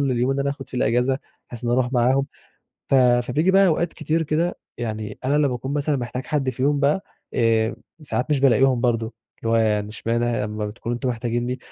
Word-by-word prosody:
لليوم 130 -2 +1
اللي 140 0 0
أنا 140 - 0
هاخُد 140 -1 -7
في - - -11
الأجازة 125 +2 +2 0.3
بحيث 120 0 -8
إني 120 - +1
اروح 125 0 +1
معاهم. 130 +2 +3 0.6
ف - - +3
فبييجي 125 +6 +3
بقى 195 +1 +5
أوقات 170 0 +1
كتير 155 +1 -1
كده 160 +3 -1 0.2
يعني 110 -2 -4
أنا 140 +3 +2
لما 140 -4 +2
اكون 130 +3 -4
مثلًا 145 0 0
محتاج 125 +1 -4
حد 140 -3 0
فيهم 140 +3 0
بقى، 150 +7 +2 0.3
آآ، 115 -1 +2 0.3
ساعات 130 -1 -2
مش 145 -3 +2
بالاقيهم 130 -1 +4
برضه، 115 -2 +1 0.3
اللي 115 - -3
هو - - +4
يعني 105 -2 +1
إشمعنى 115 +2 -1
ه 115 -3 0
أما 105 0 -3
بتكونوا 115 +3 -4
أنتم 125 +2 -2
محتاجينني، 120 +1 -2
125 Hz, 200 wpm, -23 LUFS, 120-140 Hz, 0.6 s, بقى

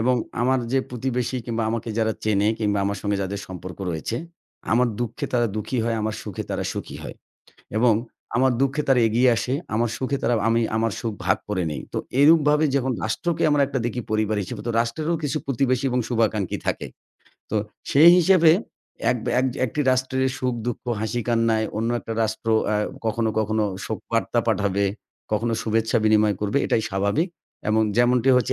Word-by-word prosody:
এবং 125 +3 +3 0.3
আমার 130 +2 +3
যে 135 - +4
প্রতিবেশী 125 0 -2
কিংবা 115 -1 -1
আমাকে 115 0 -3
যারা 110 0 +2
চেনে 105 -1 +2
কিংবা 105 -2 0
আমার 100 0 -1
সঙ্গে 100 -1 0
যাদের 100 +1 -4
সম্পর্ক 95 0 -8
রয়েছে। 80 +8 -3 0.6
আমার 125 +2 +4
দুঃখে 120 -2 -3
তারা 120 -1 +3
দুঃখী 110 +4 -2
হয়, 115 -1 0
আমার 110 0 -1
সুখে 105 -4 -5
তারা - - -2
সুখী - - -6
হয় - - -7 0.6
এবং 115 0 +5 0.4
আমার 130 +2 +4
দুঃখে 135 +2 +1
তারা 135 -2 +4
এগিয়ে 120 +4 +3
আসে। 130 - -1 0.2
আমার 115 +2 +1
সুখে 135 +1 -1
তারা 120 +1 +2
আমি 115 +1 +3
আমার 115 0 +1
সুখ 115 -2 -2
ভাগ 90 - +3
করে 95 -3 0
নেই। 70 -3 -4
তো - - -1 0.2
এরূপভাবে 150 0 +5
যখন 130 -1 +1
রাষ্ট্রকে 160 +10 -1
আমরা 145 -1 +3
একটা 135 -1 -2
দেখি 120 +1 -2
পরিবার 110 0 +1
হিসেবে। - - -7 0.2
রাষ্ট্রেরও 155 +9 -2
কিছু 145 +1 0
প্রতিবেশী 130 -1 +1
এবং 125 - +1
শুভাকাঙ্ক্ষী 110 -5 0
থাকে। - - -1 0.7
তো 110 - 0 0.3
সেই 155 +5 +8
হিসেবে 175 -2 +6 0.6
এক 125 - +1
বা - - -1
এক 130 - +1
যে - - -8
একটি 140 +5 -3
রাষ্ট্রের 130 +1 0
সুখ-দুঃখ, 120 -2 -2 0.2
হাসি-কান্নায় 115 -1 +1
অন্য 115 +2 0
একটা 115 - -6
রাষ্ট্র 110 +1 -3 0.2
অ্যা 105 - +1 0.3
কখনো, 110 0 0
কখনো 110 0 +1 0.2
শোকবার্তা 115 +2 -2
পাঠাবে, 100 -2 +1 0.5
কখনো 115 +2 +1
শুভেচ্ছা 110 0 +1
বিনিময় 110 -1 +4
করবে। 105 +6 +1
এটাই 110 - +1
স্বাভাবিক 100 - 0 0.4
এবং 110 +1 +3 0.2
যেমনটি 120 +1 +3
হচ্ছে 125 +1 +1
115 Hz, 175 wpm, -23 LUFS, 110-130 Hz, 0.7 s, সেই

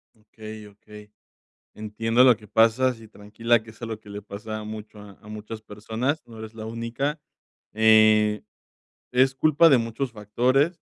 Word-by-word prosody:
Okey, 110 0 -11
okey. 105 +1 -15 0.7
Entiendo 115 +3 +1
lo 125 -3 +6
que 105 -1 -17
pasas, 115 +3 +2
y 110 - -14
tranquila, 110 +3 -1
que 110 - -13
eso 110 +2 -10
es - - -6
lo 110 -1 -6
que 105 - -15
le 100 0 -6
pasa 110 +2 -7
a 105 - -8
mucho 110 0 -9
a 105 0 -15
muchas 110 +1 -8
personas, 110 +8 -3
no 115 -1 -13
eres 110 0 -9
la 110 -1 -8
única. 115 +7 -3 0.5
Eh, 110 -1 +4 0.7
es 130 +1 +3
culpa 155 +4 +4
de 135 -5 +5
muchos 115 +3 -3
factores. 130 - 0
110 Hz, 165 wpm, -24 LUFS, 105-120 Hz, 0.7 s, lo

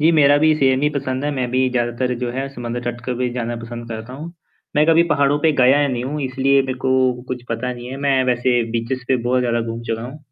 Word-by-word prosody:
जी 160 +3 +5
मेरा 145 -2 +5
भी 155 +1 +4
सेम 135 -3 +2
ही 150 - +4
पसंद 130 0 -2
है। 150 - 0
मैं 125 -2 -2
भी 130 +1 +2
ज़्यादातर 120 +1 -1
जो 125 -1 -2
है 135 +2 -3
समुद्र 120 -1 -4
तट 120 0 -4
के 125 0 -2
बीच 125 -1 -1
जाना 120 -1 -3
पसंद 120 0 -8
करता 110 +2 -7
हूँ। 155 +5 -8 0.4
मैं 150 - +4
कभी 165 +1 +5
पहाड़ों 140 +1 +2
पे 160 - +4
गया 135 +3 +5
ही 145 - +2
नहीं 120 0 -2
हूँ 150 +3 -3
इसलिए 135 +1 +2
मेरे 130 -1 -3
को 130 -1 +2
कुछ 125 -1 -4
पता 115 +2 -2
नहीं 120 0 -8
है। 135 - -5
मैं 135 -2 +3
वैसे 125 -1 +2
बीचेज़ 120 +3 -3
पे 130 - +3
बहुत 125 +1 +1
ज़्यादा 120 -1 0
घूम 115 0 -5
चुका 115 -1 -3
हूँ। 130 +5 -8
130 Hz, 255 wpm, -20 LUFS, 120-135 Hz, 0.4 s, जी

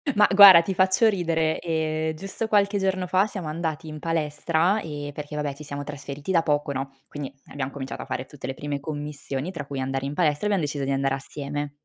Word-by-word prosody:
Ma 210 0 +6
guarda 195 -4 +11
ti 190 +3 -3
faccio 190 +4 +4
ridere, 165 -5 0
ehm, 160 -1 -1
giusto 195 +6 -4
qualche 205 -1 +3
giorno 190 -2 0
fa 190 +2 +3
siamo 190 -6 -6
andati 160 0 -3
in 155 0 -7
palestra 165 +4 +1
e 145 -2 -6
perché 150 +1 -7
vabbè, 150 -1 -2
ci 145 +2 -11
siamo 145 -1 -5
trasferiti 140 +3 -6
da 165 -2 +3
poco, 145 -1 0
no, 135 0 -4 0.2
quindi 145 -2 -6
abbiamo 135 -1 -4
cominciato 135 -2 -6
a - - -12
fare 130 -1 -4
tutte 130 -1 -9
le 135 - -3
prime 145 +1 -4
commissioni, 145 +1 -5
tra 160 -6 -6
cui 140 -1 -4
andare 135 +1 -2
in 140 - -3
palestra 150 0 +1
e - - +1
abbiamo 200 -5 +1
deciso 145 -1 -3
di 140 - -1
andare 135 0 +1
assieme 145 +1 -5
150 Hz, 220 wpm, -25 LUFS, 140-175 Hz, 0.2 s, guarda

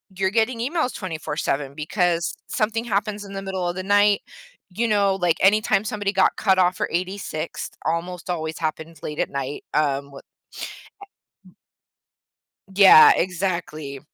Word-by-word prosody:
you're 190 0 +1
getting 230 +2 +1
emails 270 +2 -1
24/7, 150 -6 -3
because 170 +2 0
something 225 +2 -1
happens 205 -1 -2
in 195 - -10
the 195 - -4
middle 190 -2 -3
of 175 - -2
the 185 - -4
night, 205 +1 +3 0.5
you 220 +6 -1
know, 200 -3 +2
like, 175 -3 +1
anytime 200 0 +3
somebody 205 -2 -2
got 190 - +3
cut 190 -3 +2
off 180 0 +2
or - - -1
86ed, 180 -2 -4
almost 175 +2 -3
always 160 -2 -3
happens 160 0 -5
late 150 - -5
at - - 0
night, 140 +1 -5
um, 140 -2 0
wh 140 - -12
a - - -10 1.3
w - - -22 1.2
Yeah, 190 -5 +9
exactly. 170 -6 -3
185 Hz, 150 wpm, -23 LUFS, 160-205 Hz, 1.3 s, Yeah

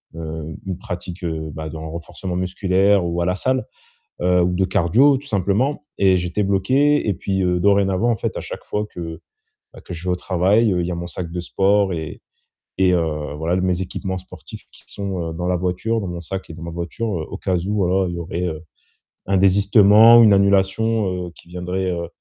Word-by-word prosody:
heu, 80 -1 -6
une 95 -2 -4
pratique, 90 -2 -7
heu, 80 -2 -3
bah, 80 0 -6
dans 80 0 -7
le 80 - -6
renforcement 85 +2 -6
musculaire 95 +1 +2
ou 85 0 -1
à - - 0
la 90 +1 +1
salle, 130 +6 -1 0.6
heu, 90 0 +3
ou 90 0 +1
de 95 +1 +2
cardio, 105 - +3
tout 145 - -11
simplement. 115 +7 0
Et 95 -2 +4
j'étais 90 +3 -2
bloqué 130 +10 +2
et 105 - +2
puis, 95 +1 -1
heu, 90 0 +1
dorénavant 100 +3 +2
en 115 - +1
fait, - - -3
à - - -3
chaque - - -8
fois 105 +1 -2
que 80 -2 -7 0.6
que 90 - -7
je 85 +2 -9
vais 90 - -1
au - - 0
travail, 95 +5 +2
heu, 90 - 0
il 85 - -1
y 90 - -3
a - - -2
mon 85 0 -5
sac 85 +1 -6
de 90 - -3
sport 100 +1 +2
et 80 -2 -6 0.6
et 95 -1 +3
heu, 75 -4 -1
voilà. 80 +2 -1
L 95 - 0
mes 90 0 0
équipements 95 +1 -4
sportifs 90 - -12
qui - - -16
sont, 95 -5 -4
heu, - - -6
dans 90 +2 -4
la 90 0 +1
voiture, 90 +6 -1
dans 95 - -4
mon 85 -1 -5
sac 95 +3 -6
et - - -7
dans 85 +1 -9
ma 85 - -6
voiture, 85 +7 -4 0.2
heu, - - -5
au - - -6
cas 90 -1 -1
où, 95 +5 -3
voilà, 95 -1 +1
il 85 - -5
y - - -4
aurait, 85 +1 -4
heu, 80 -2 -5 0.7
un 95 0 +2
désistement 100 +4 +6
ou 115 - +8
une 105 - +6
annulation, 100 -1 +1
heu, 85 - -10
qui - - -18
viendrait, 90 +1 -3
heu, 85 -1 -3
90 Hz, 225 wpm, -21 LUFS, 85-100 Hz, 0.7 s, ou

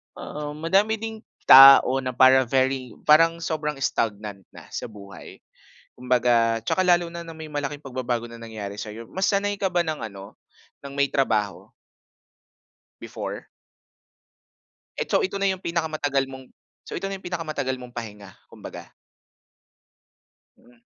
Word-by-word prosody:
ah, 150 0 -7
madami 195 +8 +2
ding 220 0 -6 0.2
tao 135 0 +9
na 130 -1 -4
para 130 -1 +6
very 130 -1 0
parang 165 +2 +4
sobrang 150 -2 -2
stagnant 105 -6 -3
na - - -14
sa - - -5
buhay. 100 -2 -13 0.5
Kumbaga 120 -2 +2
tsaka 185 +10 0
lalo 175 -1 +3
na, 170 0 -8
na 165 - -9
may 160 -1 -9
malaking 145 0 -4
pagbabago 125 -3 -4
na 115 - -11
nangyari 110 -3 -8
sa'yo. 110 +2 -8
Mas 190 +1 -1
sanay 205 0 0
ka 195 - -2
ba 175 - +3
ng 155 -2 -3 0.2
ano, 100 0 -12 0.5
ng 140 - -8
may 140 -1 +1
trabaho? 110 -7 -1 1.3
Before? - - -7 1.5
Eto - - +1
ito 195 +1 -3
na 195 - +2
yung 190 -1 -3
pinakamatagal 155 -5 -1
mong 130 0 -10 0.4
so - - -12
ito 195 - -4
na 195 - -4
yung 190 - -16
pinakamatagal 155 -7 -3
mong 125 -1 -12
pahinga, 105 -4 -8 0.2
kumbaga? - - -11 1.7
Mm. 120 -1 -24
135 Hz, 140 wpm, -24 LUFS, 120-165 Hz, 1.7 s, tao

